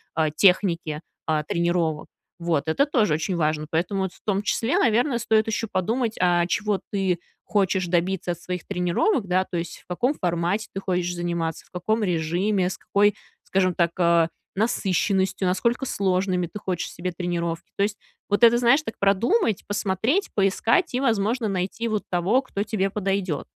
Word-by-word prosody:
а, 160 -1 +1
техники, 170 -3 +2 0.3
а, 155 -1 +1
тренировок. 170 -1 0 0.3
Вот. 165 -3 0
Это 160 - +3
тоже 230 - +2
очень 165 +5 -1
важно. 155 -2 0
Поэтому 175 +5 -1
вот 190 -1 -3
в - - -21
том 200 -2 +1
числе, 225 +4 0
наверное, 245 +3 +2
стоит 220 -1 +2
еще 220 +1 -1
подумать, 225 +5 0
а 175 -1 +3
чего 205 +1 0
ты 190 -3 0 0.2
хочешь 190 -3 +1
добиться 175 +1 0
от 175 - -5
своих 180 -1 -5
тренировок, 195 - 0
да, 185 +1 +2
то - - -7
есть 170 +1 -5
в - - -25
каком 245 +11 0
формате 175 +3 -1
ты 195 - -4
хочешь 180 -2 -1
заниматься, 170 -2 -3
в - - -27
каком 215 +5 -1
режиме, 180 +2 0
с - - -6
какой, 205 +1 +2 0.3
скажем 185 -2 +1
так, 170 -1 +2
а, 170 -1 +4 0.3
насыщенностью, 190 -3 +1
насколько 235 +8 0
сложными 185 -4 0
ты 210 - -8
хочешь 185 -4 -3
себе 180 +2 -4
тренировки. 170 -1 -3
То 200 - +2
есть 205 0 -1 0.3
вот 205 +3 +1
это, 235 0 +7
знаешь, 245 +5 +4
так 225 - -6
продумать, 215 - +2
посмотреть, 215 - 0
поискать 220 - +2
и, 250 - 0
возможно, 225 -1 +1
найти 195 +4 -2
вот 215 -2 -1
того, 185 +9 +2
кто 205 -6 -3
тебе 205 -2 -1
подойдет. 195 -6 -2
190 Hz, 170 wpm, -24 LUFS, 175-215 Hz, 0.3 s, это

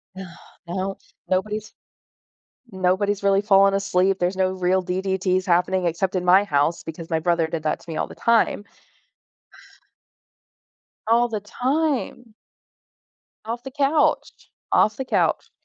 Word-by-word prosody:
No. 190 0 -7 0.4
No 190 +2 -3 0.3
nobody's 210 +3 -2 1.0
nobody's 190 +2 0
really 195 0 +3
falling 195 -1 +4
asleep, 195 -1 +1
there's 180 +2 0
no 185 0 +1
real 185 0 0
DDTs 185 0 -1
happening 180 +1 +1
except 175 +3 -1
in 180 - -1
my 185 +3 +6
house 150 -1 0
because 165 +1 -8
my 160 -1 0
brother 170 -1 +1
did 160 -1 -5
that 155 - -1
to - - -16
me 160 - -5
all - - -1
the - - -12
time. 230 -3 +1 2.4
All 235 +1 +3
the 215 -2 -3
time. 250 0 -2 1.1
Off 235 +2 -4
the 265 - -9
couch. 290 +2 0 0.2
Off 215 - +3
the 265 - -4
couch. 255 - 0
190 Hz, 135 wpm, -22 LUFS, 180-215 Hz, 2.4 s, my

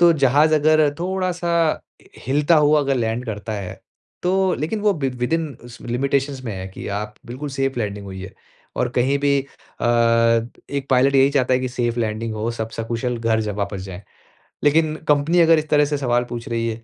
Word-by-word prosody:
तो 175 -1 +7
जहाज़ 145 +2 +3
अगर 155 0 +4
थोड़ा-सा 180 -1 -1 0.7
हिलता 145 +5 +3
हुआ 150 0 +4
अगर 140 -1 0
लैंड 115 0 -1
करता 110 0 -5
है, 95 -3 -6 0.4
तो 190 +1 +2
लेकिन 185 +9 -2
वो 210 0 +3
विद 135 -5 -2
विद 125 +5 -1
इन 165 -1 +1 0.2
उस 120 -1 -12
लिमिटेशंस 135 +2 -1
में 115 - -3
है 95 0 -6
कि - - -7
आप 105 0 -7
बिल्कुल 130 +5 -6
सेफ़ 135 -1 -2
लैंडिंग 100 -2 -3
हुई 95 -1 -7
है। 95 +1 -9 0.4
और 125 - +1
कहीं 135 +3 +2
भी 140 -1 +2
अ, 140 - -11 0.9
एक 140 -1 -3
पायलट 135 +2 +4
यही 135 +1 +5
चाहता 130 -3 +2
है 125 - +1
कि 130 - -2
सेफ़ 120 -1 -2
लैंडिंग 110 0 -2
हो, 110 +2 -2
सब 115 -1 -4
सकुशल 115 +2 -2
घर 115 -1 +1
ज 110 - -3
वापस 100 -1 -4
जाए। 95 0 -8 0.6
लेकिन 155 +1 +3
कंपनी 150 +4 +3
अगर 165 -1 +5
इस 155 0 -6
तरह 150 -1 +4
से 145 0 -1
सवाल 120 -3 +1
पूछ 120 -1 -6
रही 115 0 -1
है 115 0 -6
135 Hz, 200 wpm, -21 LUFS, 115-150 Hz, 0.9 s, तो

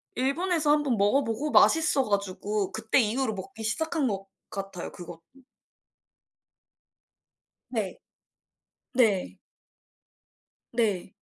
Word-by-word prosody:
일본에서 305 +4 +1
1 295 0 +3
번 250 -6 0
먹어 205 +8 +3
보고 235 +7 -2
맛있어 315 -4 +5
가지고 200 0 -1
그때 220 +4 +1
이후로 225 +1 0
먹기 220 +4 -8
시작한 315 +5 0
것 195 -2 -3 0.2
같아요 195 -3 -6
그것도. 175 -2 -10 2.5
네. 215 -6 -3 1.0
네. 220 -7 +2 1.4
네. 205 -6 0
220 Hz, 185 characters per minute, -27 LUFS, 200-275 Hz, 2.5 s, 맛있어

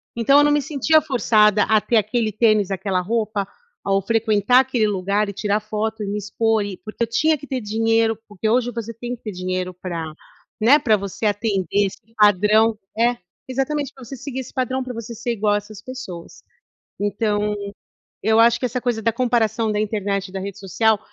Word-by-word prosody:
Então 275 +5 +4
eu 290 - +6
não 295 - +3
me 295 0 +3
sentia 305 +2 +3
forçada 215 -7 +3
a 220 -1 +3
ter 235 - -1
aquele 215 +1 0
tênis, 215 -2 +2
aquela 190 -1 -1
roupa, 215 0 -1 0.4
ou 195 0 +2
frequentar 220 +2 +3
aquele 245 -4 +1
lugar, 200 +1 0
e - - -5
tirar 205 +1 0
foto, 215 0 -3
e - - -4
me 205 +1 -2
expor 210 +1 0
e 200 - -5
porque 215 +2 -5
eu - - -1
tinha 310 +7 +2
que 285 - -11
ter 260 -2 -3
dinheiro, 225 +1 +1
porque 210 +1 -3
hoje 245 +1 +2
você 230 0 -5
tem 240 +2 -5
que - - -24
ter 215 - -4
dinheiro 185 0 -3
pra, 170 -3 -4 0.6
né, 260 +7 +6
pra 225 -7 +3
você 200 +2 -5
atender 205 -1 0
esse - - -9 0.2
padrão 210 +2 +4 0.2
é, 240 +1 +2 0.3
exatamente, 270 +2 -2
pra 265 - -13
você 270 +3 -8
seguir 265 +1 -6
esse 255 - -11
padrão, 260 0 -1
pra 255 -1 -6
você 230 0 -7
ser 235 +2 -3
igual 210 -1 +1
a - - +3
essas 205 0 -9
pessoas. 255 -10 -9 0.6
Então, 205 0 0 0.7
eu 220 +2 +3
acho 230 +1 +5
que 255 - -1
essa 250 +1 -2
coisa 240 -3 -1
da 230 +1 +2
comparação 230 -2 +1
da 210 - -1
internet 200 -2 -2
e - - -14
da 190 - -3
rede 200 +1 -6
social, 210 +3 +1
220 Hz, 200 wpm, -21 LUFS, 205-240 Hz, 0.7 s, eu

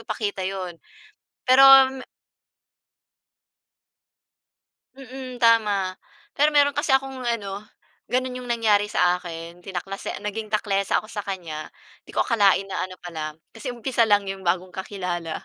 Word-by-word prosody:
ipakita 205 -3 -3
'yon. 185 -3 -5 0.7
Pero 260 +1 +7 0.3
me 265 -1 -8 2.9
Mm, 260 -1 -9
tama. 205 -5 +3 0.3
Pero 295 +2 +3
meron 285 0 +5
kasi 270 - +1
akong 270 -1 -1
ano, 205 -4 -2 0.5
gano'n 255 0 -1
'yong 250 - -9
nangyari 215 -3 +2
sa 180 -2 +2
akin 170 0 -8
tinaklase 195 +1 -5
naging 215 +1 -4
taklesa 200 -2 0
ako 215 - -2
sa 205 - -3
kanya. 170 -6 -6 0.4
'Di - - -9
ko - - +2
akalain 200 -4 +3
na 195 -1 -3
ano 185 - -11
pala 155 -3 -6 0.2
kasi 225 +4 -7
umpisa 240 -1 0
lang 205 -1 +4
'yong 195 0 -5
bagong 180 +1 0
kakilala, 180 -4 -5
205 Hz, 130 wpm, -24 LUFS, 185-235 Hz, 2.9 s, Pero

